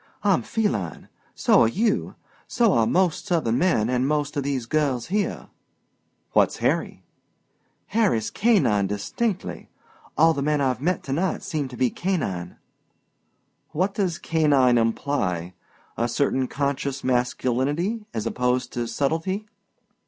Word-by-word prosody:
"I'm - - +3
feline. 105 - -2 0.3
So - - +4
are 115 - +5
you. 215 - 0 0.3
So 230 -4 +3
are 115 -1 +3
most 180 -2 +1
Southern 145 - +1
men 165 -12 +2
an' 125 +1 +1
most 145 -1 -1
of 145 - 0
these 135 -3 -2
girls 135 -2 0
here." 205 +2 -2 0.8
"What's - - +3
Harry?" - - -1 0.8
"Harry's 205 - +1
canine 180 - +3
distinctly. 185 - -3 0.5
All 165 +2 +5
the 140 - -3
men 150 +1 +1
I've 130 -3 0 0.2
to 135 - -3
night 180 +6 -1
seem 150 -4 -2
to 125 -1 -10
be 125 -2 +2
canine." 100 - -3 1.2
"What 185 +5 0
does 185 -5 -1
canine 140 -7 +3
imply? 105 -7 -1 0.4
A 120 - +1
certain 130 +1 0
conscious 140 0 -2
masculinity 130 - 0
as 110 -1 -4
opposed 125 +2 -1
to 120 -1 -2
subtlety?" 165 - -1
140 Hz, 130 wpm, -24 LUFS, 120-175 Hz, 1.2 s, are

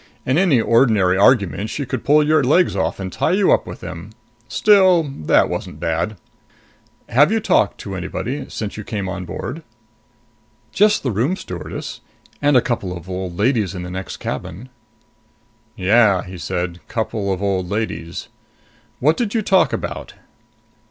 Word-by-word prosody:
"In 130 - +1
any 175 -10 +4
ordinary 110 -5 +3
argument 100 -1 +3
she 140 - -3
could 125 -2 -4
pull 150 +1 +4
your 155 -1 +3
legs 155 - +3
off 90 -2 -1
and 95 -2 -5
tie - - +1
you 195 0 +3
up - - +2
with - - -8
them. 85 +5 -8 0.4
Still, 190 -5 +5
that 135 - +1
wasn't - - -5
bad. 85 +5 -2 0.9
Have 145 - +4
you 225 - +2
talked 110 - +2
to 100 - -6
anybody 120 +10 -4
since 105 -2 -5
you 105 - -5
came 100 -3 -4
on 95 -1 -5
board?" 145 - -6 1.1
"Just 210 +1 +3
the 130 - 0
room 125 - 0
stewardess. 90 - -7 0.4
And 145 -2 +4
a 120 - +3
couple 95 -7 -2
of 85 +1 -12
old 90 -2 -5
ladies 105 -3 +1
in 90 - -5
the 90 - -7
next 95 +1 -6
cabin." 115 +10 -6 1.1
"Yeah," 100 -1 +3
he 90 -1 -9
said. 90 -1 -3
"Couple 110 -3 -2
of 95 - -2
old 95 -3 -1
ladies. 105 -5 -4 0.7
What 155 +5 +3
did 235 -2 -2
you 220 - +1
talk 190 -1 +3
about?" - - -5
110 Hz, 160 wpm, -20 LUFS, 95-145 Hz, 1.1 s, Still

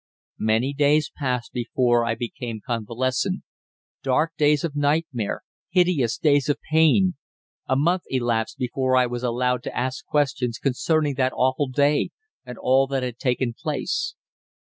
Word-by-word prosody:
Many 110 +5 +1
days 145 +1 +2
passed 125 -4 -2
before 120 -1 +1
I 115 -1 0
became 115 -1 -5
convalescent 120 +2 -1 0.6
dark 150 +5 +1
days 150 -1 +3
of 160 -4 -3
nightmare, 145 -6 0 0.3
hideous 170 -10 +2
days 145 -2 +2
of 145 - +2
pain. 160 +2 +4 0.5
A 130 - +2
month 170 +6 +1
elapsed 120 -3 -1
before 130 +1 0
I 125 - +5
was 120 0 -4
allowed 125 0 0
to - - -6
ask 130 +1 -2
questions 125 -5 0
concerning 145 +2 +1
that 130 -1 +1
awful 130 +2 +1
day 145 +3 +2 0.3
and 125 -2 -9
all 135 +1 +3
that 135 -1 -1
had 125 -1 -4
taken 125 -1 0
place. - - -2
130 Hz, 145 wpm, -24 LUFS, 120-145 Hz, 0.6 s, I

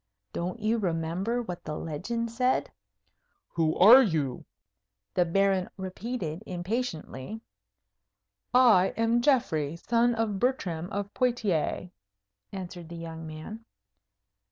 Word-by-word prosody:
Don't 180 +6 -3
you 220 +2 +1
remember 185 +6 -1
what 180 -5 -7
the 150 - -4
legend 230 +9 -3
said? 250 +2 +1 0.8
"Who 160 -2 0
are 230 +8 +9
you?" 155 - -1 0.7
the 180 - +3
Baron 190 +1 +2
repeated, 190 -2 -4
impatiently. 185 - -4 1.1
"I 230 -7 +5
am 230 +1 +2
Geoffrey, 170 - +1
son 235 +6 +2
of 220 -3 -1
Bertram 180 -9 -1
of 200 0 -4
Poictiers," 215 - 0 0.6
answered 175 -3 -7
the 170 - -7
young 165 -1 -7
man. 155 +9 -8
190 Hz, 110 wpm, -28 LUFS, 165-230 Hz, 1.1 s, are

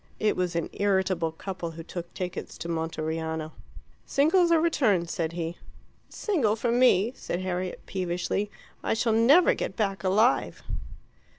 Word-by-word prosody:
It 215 - +2
was 180 -1 -1
an 170 - 0
irritable 190 -4 +1
couple 175 +1 -5
who 165 - -6
took 170 0 -7
tickets 180 -1 -5
to - - -6
Monteriano. 160 -1 -3 0.5
"Singles 340 +5 +3
or 330 - +6
returns?" 220 - +2
said 165 -1 -2
he. 165 -1 -2
"A 175 - -11 0.5
single 280 - +1
for 230 +1 -1
me," 240 -2 +4
said 175 - -4
Harriet 185 0 -3
peevishly; 185 +2 -2 0.3
"I - - 0
shall 225 0 +1
never 265 +11 +6
get - - -4
back 195 -5 -1
alive." 215 +7 +2
190 Hz, 150 wpm, -27 LUFS, 170-230 Hz, 0.5 s, or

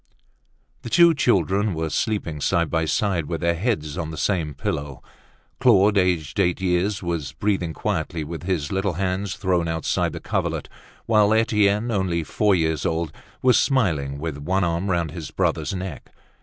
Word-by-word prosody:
The - - -7
two 170 +4 +6
children 100 - +1
were 80 -1 -2
sleeping 100 -9 -2
side 85 -1 +1
by 80 -1 +1
side, 85 -2 0
with 85 -2 -3
their 85 0 +2
heads 85 - -2
on 80 -1 -3
the 80 - -7
same 80 -7 -1
pillow. 70 -1 -4 0.6
Claude, 105 -4 +5
aged 90 -5 +1
eight 90 -2 +2
years, 95 +2 0
was 80 -5 -3
breathing 95 -1 -1
quietly, 80 +1 -2
with 80 +2 -6
his 85 -5 -2
little 95 -1 0
hands 95 +2 -2
thrown 90 -4 0
outside 80 -2 -1
the - - -5
coverlet; - - -2 0.4
while 110 -1 +4
Etienne, 105 0 +2
only 95 -5 0
four 105 +5 +2
years 80 -4 0
old, 80 -2 -1 0.3
was 125 -1 +5
smiling, 80 - +1
with 75 -1 -4
one 95 +6 0
arm 85 +3 -1
round 85 -4 0
his 80 -3 -7
brother's - - -1
neck. 90 -4 -6
90 Hz, 165 wpm, -23 LUFS, 80-100 Hz, 0.6 s, two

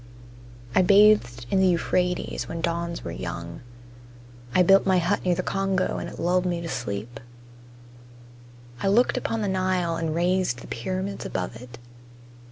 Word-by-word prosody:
I - - +5
bathed 195 - +4
in 195 - +3
the 190 - +4
Euphrates 180 +1 0
when 165 - -5
dawns 170 0 -2
were - - -5
young. 60 +1 -6 0.9
I 180 - +6
built 195 +2 +6
my 190 -1 +3
hut 180 +3 0
near 180 -1 +2
the - - -2
Congo 195 -1 -1
and - - -5
it - - -11
lulled 180 +2 +1
me 175 -1 -1
to 170 - -5
sleep. 120 -4 -5 1.6
I - - 0
looked 225 +6 +3
upon 225 -1 -2
the - - -1
Nile 185 -3 0
and 160 -1 -2
raised 175 -7 0
the - - -11
pyramids 185 +10 -4
above 95 +4 -4
it. 125 -1 -11
180 Hz, 160 wpm, -25 LUFS, 165-190 Hz, 1.6 s, I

